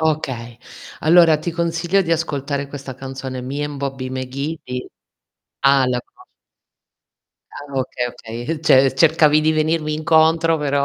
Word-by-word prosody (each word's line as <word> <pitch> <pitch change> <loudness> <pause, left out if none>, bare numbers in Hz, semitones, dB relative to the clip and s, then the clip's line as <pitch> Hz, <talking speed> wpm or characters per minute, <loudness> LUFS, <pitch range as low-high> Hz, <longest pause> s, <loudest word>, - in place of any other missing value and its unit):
Okay. 130 -7 -2 0.4
Allora 160 -1 +5
ti 170 - -4
consiglio 170 +3 0
di 165 -1 -1
ascoltare 140 -3 -2
questa 140 -2 -8
canzone: 130 0 -6
Me 140 +4 -4
and 145 -1 -6
Bobby 135 -2 -4
McGee 135 +5 -4
di 125 0 -6 0.8
ah, 135 -2 +5
la 125 -1 0
conosc 375 - -22 1.3
Ah, 145 -1 -10
okay, 125 -1 -2
okay. 115 0 -8
Uhm, 160 -2 -2
ce 135 -4 +5
cercavi 155 +1 +4
di 155 +1 +2
venirmi 155 0 0
incontro, 160 +1 +3
però 140 -1 0
145 Hz, 145 wpm, -20 LUFS, 130-160 Hz, 1.3 s, Allora